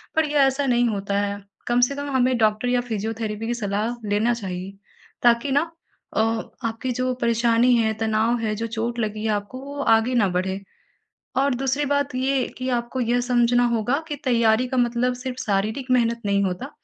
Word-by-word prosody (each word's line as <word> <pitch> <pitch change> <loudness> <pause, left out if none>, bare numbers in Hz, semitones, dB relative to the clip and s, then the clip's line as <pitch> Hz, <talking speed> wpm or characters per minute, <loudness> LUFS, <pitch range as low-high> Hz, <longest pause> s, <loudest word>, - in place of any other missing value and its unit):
पर 320 0 +3
ये 295 - +1
ऐसा 270 +1 +3
नहीं 245 -2 +3
होता 200 -1 -1
है 200 0 -3 0.2
कम 240 0 +2
से 280 +3 +2
कम 285 0 -4
हमें 255 -1 +2
डॉक्टर 215 +2 +2
या 245 0 +2
फिजियोथेरेपी 225 -1 -3
की 240 - 0
सलाह 215 +1 -2
लेना 220 +4 +2
चाहिए 190 -4 -5 0.5
ताकि 240 +3 +4
न 285 - +5 0.6
अ - - +4 0.5
आपकी 225 +3 -3
जो 255 +1 -1
परेशानी 235 +1 +3
है, 220 -1 +2
तनाव 220 +2 +1
है, 220 -2 -1
जो 230 +2 -3
चोट 230 +1 -3
लगी 215 -1 -2
है - - +1
आपको 205 +5 -4
वो 285 +1 -7
आगे 225 +3 +2
ना 220 -5 +4
बढ़े 190 +2 -1 0.8
और 275 0 +2
दूसरी 270 +3 0
बात 285 -1 0
ये 260 0 +1
कि 255 0 -3
आपको 235 +2 -3
ये 245 +1 +1
समझना 245 0 +3
होगा 240 +5 +1
कि 295 - -3
तैयारी 235 -1 +3
का 260 - -2
मतलब 245 0 +1
सिर्फ 255 -2 -4
शारीरिक 215 +6 -1
मेहनत 235 -2 +2
नहीं 200 0 +2
होता। 190 +9 -3
235 Hz, 190 wpm, -23 LUFS, 220-255 Hz, 0.8 s, न